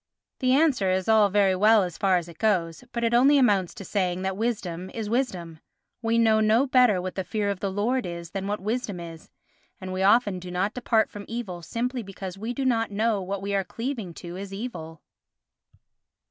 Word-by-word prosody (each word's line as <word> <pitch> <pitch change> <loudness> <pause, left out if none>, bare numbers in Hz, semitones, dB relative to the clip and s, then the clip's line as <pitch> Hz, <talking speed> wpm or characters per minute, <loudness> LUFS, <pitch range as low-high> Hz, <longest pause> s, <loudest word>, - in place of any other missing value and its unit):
The 255 0 +2
answer 270 -9 +3
is 185 0 0
all 220 -2 +5
very 195 -1 +3
well 210 +2 +5
as 175 -2 -5
far 190 -2 +3
as 175 -1 -4
it 170 -1 -13
goes, 180 -4 0
but 235 - -3
it 230 0 +1
only 270 +4 +6
amounts 205 -9 +2
to 195 - -9
saying 185 -1 -1
that 190 0 -1
wisdom 190 -5 -3
is 220 -2 -5
wisdom. 180 -11 -2 0.4
We 230 0 +1
know 220 -1 +4
no 220 +4 +3
better 250 -7 +4
what 185 +1 -4
the 190 - -3
fear 205 +1 -1
of 195 - -5
the 200 - -2
Lord 230 +4 0
is 170 -1 -7
than 195 0 -4
what 205 +1 -2
wisdom 215 -1 -3
is, 165 -1 -10 0.5
and 185 -1 -6
we 185 - -2
often 205 -1 +3
do 180 0 -9
not 185 +4 -1
depart 230 -3 +1
from 205 -1 -8
evil 215 -7 -5
simply 245 +8 -3
because 195 -2 -7
we 220 +4 -4
do 265 +2 -3
not 230 -3 +1
know 215 +1 0
that 190 - -6
what 195 0 -3
we 200 0 -2
are 195 -1 +1
cleaving 230 -5 -5
to 175 +1 -8
is 195 0 -7
evil. 195 -7 -7
200 Hz, 215 wpm, -26 LUFS, 185-230 Hz, 0.5 s, only